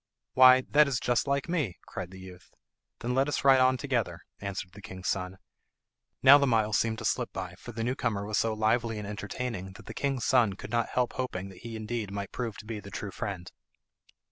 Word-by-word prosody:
Why, 130 0 +8
that 150 0 +6
is 130 -4 0
just 120 +3 +1
like 140 0 0
me," 150 - -1
cried 90 -1 -6
the 95 0 -11
youth. 90 -1 -13 0.5
"Then 120 +1 -1
let 135 +2 +2
us - - -1
ride 135 -1 +7
on 130 0 +4
together," 120 -11 -2 0.2
answered 100 -2 -5
the 100 +2 -13
king's 95 -2 -7
son. 90 0 -2 0.9
Now 140 +2 +10
the 140 - +2
miles 110 -3 +2
seemed 110 -1 0
to - - -6
slip - - 0
by, 90 -2 -5
for 120 - -9
the 115 0 -4
new 125 +2 0
comer 110 -6 -2
was 105 +1 0
so 110 -1 0
lively 110 +1 +1
and 105 -1 -5
entertaining 105 -1 -5
that 95 - -14
the - - -8
king's 135 -3 -1
son 120 -6 +4
could 100 - -9
not 120 0 +1
help 125 -1 0
hoping 100 -7 -4
that 95 - -13
he 115 -1 -7
indeed 110 -1 -3
might 100 0 -5
prove 115 -4 -4
to - - -10
be 110 -1 -5
the 100 - -10
true 100 0 -5
friend. 95 -2 -5
110 Hz, 220 wpm, -29 LUFS, 100-125 Hz, 0.9 s, Now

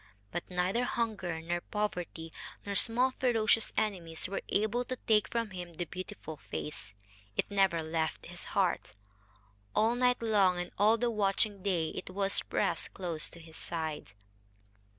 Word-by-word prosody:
But 175 - -4
neither 185 +6 +1
hunger, 215 -9 -1
nor 175 +1 -1
poverty, 180 -6 -3 0.3
nor 200 - -2
small 245 +6 +4
ferocious 225 -3 +3
enemies 175 -7 0
were 195 - -2
able 220 +4 +2
to 255 - -3
take 215 -4 +3
from 230 -3 -1
him 175 -2 -7
the 175 - -2
beautiful 185 -3 -7
face. 115 -8 -6 0.4
It - - 0
never 190 -5 +3
left 160 0 -1
his - - -7
heart. - - +1 0.8
All 220 +2 +4
night 250 0 +3
long 200 -5 +4
and 175 0 -3
all 215 +3 +6
the 240 +1 +1
watching 205 -1 +2
day 175 -5 +1
it - - -6
was 195 +1 +1
pressed - - -1
close 170 -4 -2
to 170 - -11
his 160 -1 -11
side. 160 - -4
195 Hz, 150 wpm, -32 LUFS, 170-220 Hz, 0.8 s, all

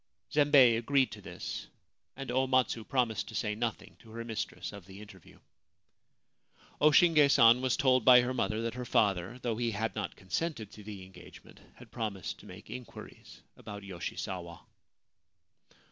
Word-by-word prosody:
Zembei 145 -5 +6
agreed 135 +2 +2
to - - -9
this, - - -7 0.5
and 135 -2 -6
O 130 +1 +1
Matsu 130 -3 +1
promised 115 -4 -1
to - - -9
say 105 -3 -1
nothing 115 +1 -4
to 115 - -18
her 115 +1 -7
mistress 110 -3 -5
of 100 -4 -11
the 95 +1 -12
interview. 100 -5 -14 1.4
O 150 - +6
Shinge 155 -1 +5
San 120 -2 +6
was 130 -1 +1
told 130 -3 +3
by 125 0 +8
her 125 +1 -2
mother 110 -3 -1
that 115 -1 -2
her 125 +1 -5
father, 100 -1 +1
though 115 -3 -1
he 120 0 0
had 110 +1 -3
not 105 -4 -4
consented 110 - -4
to 105 - -12
the 100 -2 -8
engagement, 95 - -15 0.2
had - - -16
promised 105 -5 -4
to - - -14
make - - -12
inquiries 125 0 -11
about 105 -1 -9
Yoshisawa. 90 -2 -6
115 Hz, 160 wpm, -31 LUFS, 105-130 Hz, 1.4 s, by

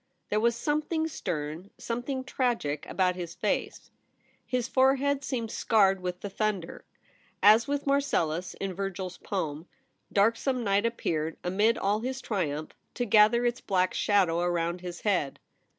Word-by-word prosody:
There 210 - +1
was 235 +1 +2
something 310 +4 -1
stern, 160 - -4
something 245 +3 -3
tragic 235 - -1
about 180 -1 +1
his 175 -2 -6
face. - - -2 0.6
His 250 -2 -1
forehead 270 +2 +2
seemed 235 -5 -3
scarred 195 -5 +3
with 180 0 -4
the 205 - -4
thunder. 200 -4 -2 0.6
As 215 +3 +7
with 285 0 -2
Marcellus 185 - 0
in 195 -1 -4
Virgil's 190 -1 -4
poem, 160 -4 -4 0.4
dark 215 +3 +3
some 255 -2 -1
night 200 +1 +2
appeared, 160 -8 -2
amid 205 +6 +2
all 205 +2 +1
his 260 +3 -3
triumph, 155 - -2 0.2
to 245 - -1
gather 220 +3 +5
its 240 +1 0
black 185 -1 +1
shadow 185 -5 +2
around 175 0 -1
his 175 -1 -7
head. 180 -10 0
205 Hz, 145 wpm, -28 LUFS, 180-245 Hz, 0.6 s, As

